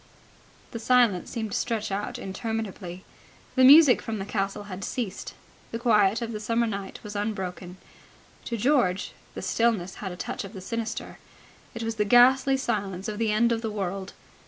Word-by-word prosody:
The 230 - -5
silence 230 -5 +3
seemed 220 -3 -4
to - - 0
stretch 220 -3 -2
out 200 +2 -3
interminably. 195 -3 -5 0.5
The 260 - +3
music 280 0 +8
from 220 -1 -4
the 195 - -4
castle 200 0 -2
had 195 -1 -7
ceased. 220 -4 -4 0.4
The 230 - -2
quiet 220 -2 +3
of 230 - -4
the 215 - -4
summer 230 +2 +1
night 200 -3 -5
was 210 -1 -8
unbroken. 190 -3 -4 0.7
To 235 - -3
George 210 -6 +1 0.2
the - - -6
stillness 220 -6 0
had 190 -3 -4
a - - -6
touch - - -4
of 195 +1 -9
the 195 - -7
sinister. 230 +3 -5 0.6
It 230 - -4
was 225 0 -3
the 210 - +2
ghastly 260 +4 +5
silence 200 -6 -2
of 210 0 -4
the 225 -2 +1
end 235 +3 +3
of 230 -1 0
the 225 - -2
world. 195 -2 -4
215 Hz, 180 wpm, -26 LUFS, 195-235 Hz, 0.7 s, music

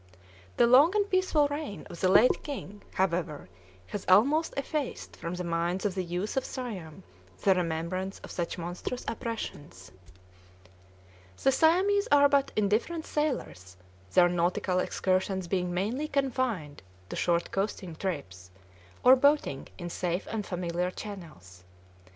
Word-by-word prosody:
The 240 - +6
long 275 - +6
and 410 -1 +2
peaceful 370 -6 +2
reign 290 -8 -5
of 170 - -10
the 185 - +2
late 215 +6 +5
king, 205 -8 -7
however, 170 - -1 0.4
has 200 - -5
almost 275 - +4
effaced 280 0 -3
from 170 +1 -5
the 180 - -4
minds 170 +3 -1
of 200 - +1
the 185 -1 -2
youth 180 +4 -3
of 265 - +1
Siam 200 - -6 0.4
the 195 - +6
remembrance 180 +2 -2
of - - -10
such 170 0 -3
monstrous 175 +8 -5
oppressions. 150 - -6 1.5
The 270 - +5
Siamese 375 +8 +3
are 285 0 +7
but 280 -1 +2
indifferent 215 +11 0
sailors, 245 - -3 0.4
their 175 -1 +6
nautical 175 +1 0
excursions 185 0 0
being 180 0 -1
mainly 220 +12 -1
confined 255 - -1 0.3
to - - -5
short 170 -1 0
coasting 195 -3 -3
trips, 115 - -5 0.5
or 255 +1 +9
boating 280 - +2
in 175 -2 -6
safe 180 +1 -2
and 220 -2 -2
familiar 180 -1 -2
channels. 160 - -10
190 Hz, 135 wpm, -29 LUFS, 175-265 Hz, 1.5 s, or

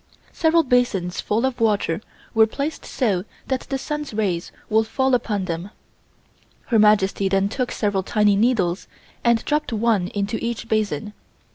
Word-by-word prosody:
Several 330 0 +3
basins 240 - +1
full 225 +4 0
of 265 -2 -2
water 205 -5 +1 0.3
were 220 -1 +5
placed 285 +7 -4
so 210 -9 0 0.3
that 260 -1 +1
the 270 - 0
sun's 295 -3 -5
rays 185 -6 -1 0.2
would 220 0 +2
fall 265 +2 +1
upon 210 -5 0
them. 170 +2 -4 1.0
Her 225 - +4
Majesty 200 -2 +3
then 195 +1 +2
took 250 +2 -2
several 205 -3 0
tiny 210 +1 +2
needles 200 -5 +1 0.4
and 235 -1 +2
dropped 300 -3 0
one 220 -4 +1
into 205 +2 -3
each 235 0 -3
basin. 210 -3 -1
220 Hz, 150 wpm, -22 LUFS, 195-245 Hz, 1.0 s, were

